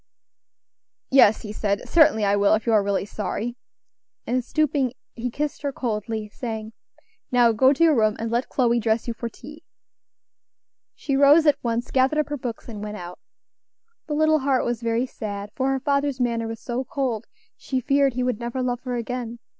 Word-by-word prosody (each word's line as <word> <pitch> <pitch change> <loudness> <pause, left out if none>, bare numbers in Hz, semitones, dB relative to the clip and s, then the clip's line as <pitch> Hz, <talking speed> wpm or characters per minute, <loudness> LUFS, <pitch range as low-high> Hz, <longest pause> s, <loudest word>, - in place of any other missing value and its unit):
"Yes," 255 -5 +5
he 210 -1 -6
said, 200 -1 -2
"certainly 285 -10 +4
I 200 0 +3
will, 205 +1 +4
if 215 - -4
you 230 - +2
are 215 - +5
really 200 -1 -1
sorry;" 215 +3 -4 0.7
and 250 +1 0
stooping, 285 -3 0 0.2
he 245 +1 -4
kissed 295 +4 -3
her 285 -1 -2
coldly, 220 -3 -3
saying, 220 0 -6 0.6
"Now 245 -2 +5
go 260 +5 +4
to 290 +4 +2
your 320 -3 +5
room, 215 -2 +2
and 225 0 -4
let 240 +2 -1
Chloe 240 -2 +2
dress 220 +1 0
you 235 - -1
for 235 0 -5
tea." 300 +7 -13 1.3
She 275 - -2
rose 285 +4 +6
at 295 - +3
once, 235 0 -2
gathered 265 +3 +2
up 305 -1 0
her 295 - -2
books, 245 -3 -6
and 215 -3 -7
went 210 0 -5
out. 175 -1 -9 0.9
The 300 - -2
little 310 0 +3
heart 270 -2 +1
was 240 -1 -2
very 230 +1 0
sad; 205 -4 -6
for 265 +1 0
her 270 0 0
father's 280 0 0
manner 230 -2 0
was 225 0 -6
so 245 +1 -3
cold 250 -5 -3 0.3
she 260 - -3
feared 275 0 +2
he 250 - 0
would 250 -3 -1
never 240 +2 -3
love 245 -1 -2
her 250 -1 -2
again. 240 0 -4
240 Hz, 190 wpm, -24 LUFS, 220-270 Hz, 1.3 s, rose